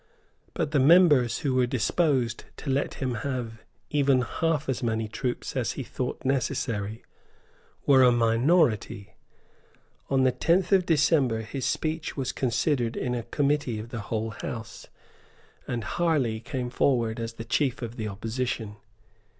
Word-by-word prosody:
But 160 -4 -1
the 145 - +3
members 145 -5 +5
who 135 - +2
were 130 -1 +3
disposed 130 0 0
to 140 - -3
let 140 +2 -1
him 130 -2 -2
have 120 -5 -4 0.3
even 140 -3 +3
half 160 +2 -1
as 130 -2 -1
many 110 -2 -1
troops 120 +3 -4
as - - -1
he - - -5
thought - - -5
necessary 115 -5 -1 0.8
were 135 -2 +6
a 125 -1 +7
minority. 115 - +2 1.0
On 135 -1 +3
the 130 - +4
tenth 175 +8 +1
of 190 -2 +4
December 145 -7 +3
his 130 +4 -5
speech 160 0 -2
was 130 -2 -1
considered 120 0 0
in 125 -1 -1
a 120 - -2
Committee 140 -2 0
of 110 +2 -7
the 115 - -5
whole 110 +1 -3
House; 110 +1 -7 0.8
and 120 -2 -3
Harley 140 -8 0
came 125 +1 -4
forward 120 -4 +1
as 115 0 -4
the 115 0 -8
chief 130 +1 0
of 115 0 -6
the 110 -3 -4
opposition. 110 +1 -4
125 Hz, 150 wpm, -27 LUFS, 115-140 Hz, 1.0 s, a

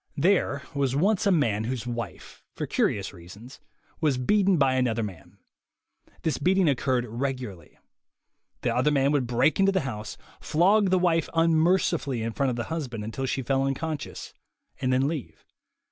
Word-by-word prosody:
There 150 -3 +2
was 135 -2 0
once 200 +7 +2
a - - +4
man 110 - +1
whose 125 -1 -3
wife, 120 -9 -6
for - - -3
curious 100 -1 -1
reasons, 100 +8 -13 0.4
was 150 -5 +1
beaten 195 +7 +3
by 135 -3 +3
another 120 -3 +1
man. 95 -6 -9 0.9
This 160 - 0
beating 185 0 +3
oc 140 -4 +2
curred 130 -2 0
regularly. 120 - -5 0.8
The - - 0
other 150 - +3
man 140 -1 +2
would 140 -4 +1
break 125 +8 +2
into 195 0 +4
the 190 -2 +1
house, 110 -6 -6 0.2
flog 195 +5 +3
the 185 - +3
wife 170 -2 +1
unmercifully 165 -5 +2
in 115 0 -3
front 140 +2 0
of 125 - -2
the 120 - -2
husband 125 -9 -4
until 120 +5 -4
she 130 - -2
fell 135 +2 +1
unconscious, 145 +2 -4 0.5
and 130 - 0
then 130 +2 +2
leave. 150 -4 -6
135 Hz, 165 wpm, -26 LUFS, 120-165 Hz, 0.9 s, a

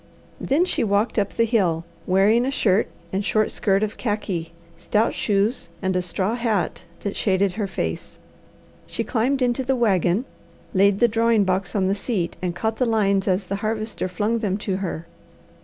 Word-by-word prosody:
Then 305 +7 +2
she 365 - +1
walked 210 +2 +1
up 200 -1 -2
the 230 - +3
hill, 180 -8 +1 0.2
wearing 200 +6 +4
a 260 - 0
shirt 215 -7 +2 0.3
and 195 +2 0
short 215 +1 +1
skirt 195 +1 +1
of 215 - -3
khaki, 195 -7 -2 0.2
stout 210 +6 +1
shoes, 205 -1 0
and 190 -1 -1
a 180 - +2
straw 185 +4 -1
hat 220 -8 -1 0.2
that 200 - -3
shaded 195 -1 +2
her 205 +1 -3
face. - - -4 0.7
She - - -3
climbed 255 +3 0
into 245 +1 +1
the 265 +1 +1
wagon, 200 -2 +2 0.5
laid 195 +1 +4
the 240 - +5
drawing 230 -1 +3
box 190 0 -1
on 195 -2 +2
the 190 - +2
seat, 200 -5 -2
and 180 -2 -2
caught 220 +4 -1
the 250 - +1
lines 200 -3 +2
as 190 +1 +1
the 200 - -3
Harvester 215 -1 -2
flung 210 +5 -1
them 200 -3 -1
to 200 -2 -2
her. 175 -4 -4
205 Hz, 180 wpm, -23 LUFS, 190-225 Hz, 0.7 s, the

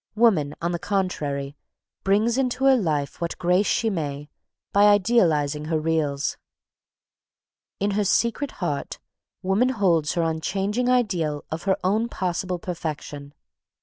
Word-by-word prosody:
Woman, 190 -11 +3
on 170 - 0
the 170 - -2
contrary, 145 -9 -2 0.5
brings 210 +4 +2
into 265 0 0
her 270 -1 +7
life 155 - -1
what 170 - -3
grace 180 +3 +2
she 230 - +1
may, 145 -4 -4 0.4
by 200 +1 +5
idealising 170 -9 +3
her 160 0 0
reals. 155 -3 -1 1.4
In 200 +1 0
her 205 +1 +1
secret 235 +7 0
heart, 150 -7 -3 0.5
woman 195 +7 +2
holds 180 - +1
her 170 - 0
unchanging 195 +9 -1
ideal 180 -12 0
of 160 +3 -5
her 190 -1 +2
own 215 +5 +1
possible 180 -1 -2
perfection. 150 -4 -6
180 Hz, 130 wpm, -24 LUFS, 155-210 Hz, 1.4 s, her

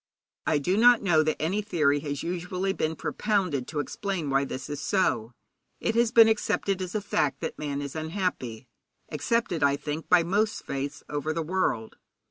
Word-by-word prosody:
'I 155 - +3
do 180 +7 0
not 240 0 +6
know 165 -5 +4
that 155 0 -1
any 185 +7 0
theory 155 -8 +2
has 145 -1 -4
usually 180 +2 -2
been 160 -3 -1
propounded 180 - -1
to 155 - -3
explain 170 -1 -3
why 135 +1 +2
this 130 0 -6
is 145 -1 -5
so. 120 - +1 0.5
It 225 - 0
has 230 0 +3
been 230 -2 +8
accepted 200 -3 0
as 180 +1 -5
a 210 - 0
fact 150 -8 0
that - - -4
man 145 -1 -3
is 140 +1 -6
unhappy, 155 - -3 0.4
accepted, 180 +1 0
I 140 -1 +4
think, 150 +2 -5
by 180 -2 +6
most 210 +5 0
faiths 140 +1 -4
over 150 +1 -2
the 165 0 -2
world. 155 -10 -1
160 Hz, 180 wpm, -27 LUFS, 145-195 Hz, 0.5 s, been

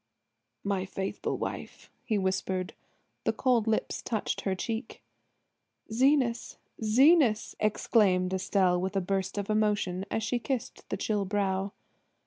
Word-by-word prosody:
"My 200 -2 0
faithful 190 0 -3
wife!" - - -6
he 230 -4 0
whispered. 190 -1 -1 0.5
The - - +2
cold 245 -4 +2
lips 220 - 0
touched 220 -3 -2
her 190 -1 -1
cheek. 225 +5 -5 0.9
"Zenas, 255 -1 +2 0.3
Zenas!" 250 +1 +4
exclaimed 195 -3 +2
Estelle 185 -1 +2
with 190 +2 -3
a - - +3
burst 190 +1 -2
of 200 -1 -2
emotion 210 -3 +1
as 220 - -1
she 240 +3 0
kissed 255 0 -4
the - - -2
chill 210 -2 0
brow. 195 0 -1
205 Hz, 125 wpm, -29 LUFS, 190-225 Hz, 0.9 s, Zenas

